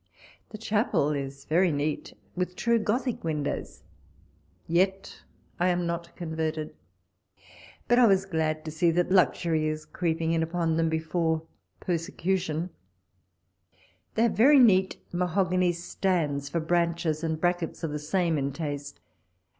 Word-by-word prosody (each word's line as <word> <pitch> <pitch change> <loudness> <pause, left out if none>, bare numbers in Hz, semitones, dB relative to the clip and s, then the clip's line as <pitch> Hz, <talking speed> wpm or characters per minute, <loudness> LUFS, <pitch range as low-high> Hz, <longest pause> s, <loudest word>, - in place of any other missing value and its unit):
The 215 - -8
chapel 205 - +1
is 140 -1 -5
very 175 +2 +3
neat, 145 +1 -3 0.2
with 180 0 -2
true 235 +4 +2
Gothic 235 +3 -1
win 155 -3 -1
dows - - -5 0.8
(yet 190 +3 0 0.4
I 175 - +3
am 175 -1 +1
not 170 0 -4
converted); 160 -2 -3 1.1
but 240 +1 +4
I 245 - +7
was 195 -1 +3
glad 160 -4 -1
to 155 - -4
see 160 +2 +2
that 175 +2 +1
luxury 165 -2 +2
is 155 0 -3
creeping 165 -2 -1
in 165 -1 +1
upon 165 0 0
them 165 0 +2
be 160 - +1
fore 160 0 -1 0.4
persecution: 175 0 -2 1.4
they 225 - +3
have 235 - +3
very 280 +7 +6
neat 190 -7 +5 0.2
mahogany 180 0 +1
stands 165 -5 -1
for 170 - -1
branches, 170 -1 0
and 160 -1 -1
brackets 175 -1 -1
of 160 - -2
the 150 - -3
same 165 +1 0
in 140 0 -2
taste. 145 -2 -5
170 Hz, 140 wpm, -27 LUFS, 155-185 Hz, 1.4 s, I